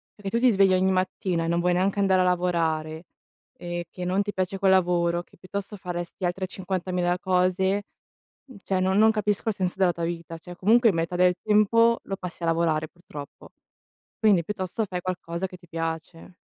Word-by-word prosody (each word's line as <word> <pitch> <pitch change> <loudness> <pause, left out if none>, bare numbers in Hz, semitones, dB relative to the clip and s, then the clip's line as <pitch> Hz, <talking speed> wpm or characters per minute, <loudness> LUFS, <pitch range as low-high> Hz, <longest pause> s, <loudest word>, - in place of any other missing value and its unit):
perché 205 +1 -5
tu - - +1
ti 250 - +7
svegli 195 -2 +4
ogni 185 +1 +3
mattina 185 -2 -1
e - - -2
non 170 +1 +1
vuoi 180 +1 +2
neanche 190 +3 +1
andare 190 -2 +3
a - - +4
lavorare, 165 -3 0 0.5
ehm, 175 0 -4
che 180 - -7
non 185 +3 +1
ti 205 0 -3
piace 190 0 -2
quel 190 -1 +4
lavoro, 175 -2 +2
che - - -24
piuttosto 200 +2 -6
faresti 175 0 -5
altre 180 +2 -1
50.000 180 -1 -2
cose, 190 +2 +1 0.6
mhmm, 260 -6 -13
cioè 190 -1 0
non 190 +1 +1
non 220 +1 +6
capisco 210 0 -1
il 220 - +1
senso 180 -1 -1
della 185 -2 +3
tua 170 0 -4
vita. 165 -1 -5
Cioè, 175 +2 -11
comunque 225 +4 +4
metà 165 +1 -2
del 180 0 +4
tempo 230 +2 +4
lo 195 - -4
passi 180 -2 -8
a - - 0
lavorare, 165 -2 +1
purtroppo. 150 -5 -11 0.7
Quindi 205 -6 +4
piuttosto 190 +3 -3
fai 180 -2 -4
qualcosa 180 0 -4
che 185 - -12
ti 175 0 -20
piace. 165 +1 -5
185 Hz, 195 wpm, -25 LUFS, 175-195 Hz, 0.7 s, ti